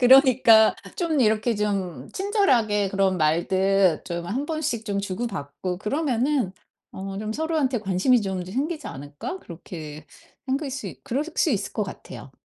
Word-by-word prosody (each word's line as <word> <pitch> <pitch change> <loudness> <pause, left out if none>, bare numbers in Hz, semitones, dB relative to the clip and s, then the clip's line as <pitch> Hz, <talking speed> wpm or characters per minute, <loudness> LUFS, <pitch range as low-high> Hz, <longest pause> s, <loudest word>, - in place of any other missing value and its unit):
그러니까 250 -4 +7 0.2
좀 330 -5 0
이렇게 220 +1 +2
좀 190 -10 -2
친절하게 245 - +2
그런 195 -1 +2
말들 185 +2 +2
좀 170 0 -4
한번씩 280 - -2
좀 200 -2 -1
주고받고 185 -4 -4
그러면은 255 - 0 0.4
어 195 0 -6
좀 215 0 -3
서로한테 300 -4 0
관심이 215 +5 +3
좀 190 -2 -3
더 185 - -9
생기지 300 +5 -2
않을까? 145 - -6
그렇게 155 -3 -9 0.4
생길 275 +1 -2
수 260 -6 -5
이 135 -7 -11
그럴 275 +5 -1
수 - - +3
있을 200 -5 -1
것 215 - -1
같아요. 160 -8 -8
210 Hz, 305 characters per minute, -24 LUFS, 185-265 Hz, 0.4 s, 그러니까